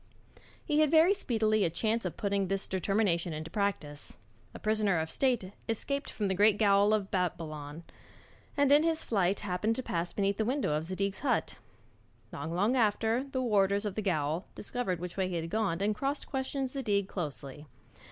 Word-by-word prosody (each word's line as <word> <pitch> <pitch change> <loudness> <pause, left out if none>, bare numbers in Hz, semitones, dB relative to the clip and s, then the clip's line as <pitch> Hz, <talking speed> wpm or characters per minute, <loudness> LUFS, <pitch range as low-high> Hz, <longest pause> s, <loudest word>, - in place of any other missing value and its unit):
He 300 -2 +1
had 310 -1 +4
very 325 +5 +6
speedily 220 - +1
a 170 - +2
chance 220 +6 -1
of 180 - -4
putting 200 -1 0
this 195 +1 -2
determination 190 -3 0
into 155 +1 -6
practice. 170 -8 -2 0.3
A - - -9
prisoner 215 -4 +1
of 160 0 -2
state 245 -8 0 0.2
escaped 280 +6 -1
from 210 - -2
the 190 - +1
great 205 +2 +4
gaol 205 -1 +4
of 210 -2 0
Babylon, 160 -4 -3 0.7
and 285 -1 +4
in 290 +1 +7
his 325 0 +1
flight 195 -3 +1
happened 205 +3 0
to 260 - -3
pass 170 -3 -2
beneath 200 -1 0
the 220 - +1
window 255 - 0
of 155 +2 -1
Zadig's 195 +2 -2
hut. 275 -3 0 0.8
Not 160 - -5
long 200 +9 +1
after, 225 +2 +2
the 260 -2 -2
warders, 200 -2 +2
of 205 - -2
the 215 - -2
gaol 160 -3 -1
discovered 205 -6 -3
which 180 +1 -6
way 190 -1 +1
he 180 - -3
had 165 0 -3
gone, 200 -5 0
and 210 +1 +2
cross 275 +6 -2
questioned 265 -1 -3
Zadig 205 -8 0
closely. 150 -4 -6
200 Hz, 180 wpm, -30 LUFS, 180-230 Hz, 0.8 s, in